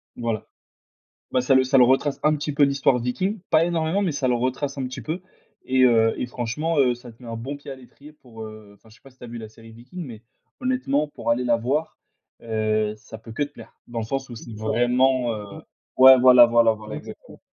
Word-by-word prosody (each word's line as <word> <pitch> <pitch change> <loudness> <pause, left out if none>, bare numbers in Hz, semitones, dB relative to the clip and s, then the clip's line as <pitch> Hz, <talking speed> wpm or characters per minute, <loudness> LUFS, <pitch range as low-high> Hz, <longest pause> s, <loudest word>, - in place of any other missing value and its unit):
Voilà. 115 -3 -3 0.9
Bah 130 - +2
ça 130 +2 +2
le 130 - +5
ça 130 +1 +2
le 125 - +7
retrace 135 +3 +2
un 155 0 +3
petit 150 0 -4
peu 145 +1 +3
l'histoire 140 -2 +2
Viking, 185 - -2
pas 160 +1 +4
énormément, 170 +2 0
mais 190 -4 0
ça 140 -2 -1
le 125 - +2
retrace 130 +3 -2
un 135 - -2
petit 130 +1 -7
peu, 160 - -4 0.4
et 130 0 +2
heu, 115 -2 +4
et - - -1
franchement, 135 +7 -2
heu, 125 -3 +3
ça 120 0 -13
te 115 - -23
met 120 - -11
un 115 - -5
bon 130 +5 -6
pied 140 0 -10
à - - -7
l'étrier 140 +3 -16
pour, 120 -6 -12
heu 110 -1 -11
enfin 110 - -23
je 110 - -18
sais 120 - -25
pas 135 - -16
si 130 - -27
tu - - -15
as - - -8
vu 120 0 -8
la 110 -2 -9
série 115 +1 -16
Viking, 125 +10 -10
mais 115 -5 -10 0.4
honnêtement 250 - 0
pour 145 - -3
aller 120 +2 0
la 120 -1 +2
voir, 140 +7 -2 0.4
heu, 110 -1 -1
ça 110 0 -12
ne - - -21
peut 115 - -11
que 115 - -1
te 145 - -6
plaire. - - -14
Dans 120 -1 -5
le 110 - -3
sens 135 +3 -4
où 120 - -8
c'est 115 0 -10
vraiment, 120 +3 +1
heu, 105 -1 -6 0.5
ouais 130 0 +9
voilà 125 -1 +8
voilà 115 -1 +3
voilà, 110 0 -9
exactement. - - -11
125 Hz, 245 wpm, -23 LUFS, 115-140 Hz, 0.9 s, ouais